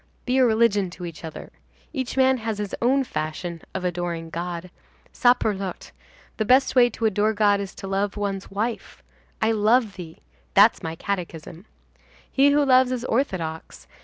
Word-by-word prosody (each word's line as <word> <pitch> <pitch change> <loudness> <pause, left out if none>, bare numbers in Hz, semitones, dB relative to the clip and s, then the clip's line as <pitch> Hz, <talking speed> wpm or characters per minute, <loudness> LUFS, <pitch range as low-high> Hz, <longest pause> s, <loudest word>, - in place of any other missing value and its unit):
Be 255 +1 +1
a 260 - +6
religion 220 -4 +2
to 180 - -6
each 170 -1 -9
other. 160 - -8 0.4
Each 265 -3 -4
man 265 0 +4
has 225 -2 -3
his 205 -1 -5
own 265 +3 +3
fashion 165 -4 -5
of 185 - -3
adoring 175 -2 -3
God. 175 +1 -5 0.4
Saperlotte! 210 -6 +1 0.5
the 220 - +1
best 255 +6 +3
way 245 -1 +6
to 225 0 -4
adore 215 +1 +2
God 205 -1 +3
is 195 -1 -6
to 195 - -8
love 195 +1 -1
one's 200 -2 -3
wife. 220 +4 -4 0.4
I 220 - +3
love 220 0 +2
thee! 165 - -10 0.3
that's - - +6
my 160 0 -5
catechism. 175 -1 -5 0.7
He 275 +1 +4
who 290 0 +3
loves 255 -1 +4
is 250 -1 -3
orthodox. 185 - -3
205 Hz, 160 wpm, -24 LUFS, 180-245 Hz, 0.7 s, a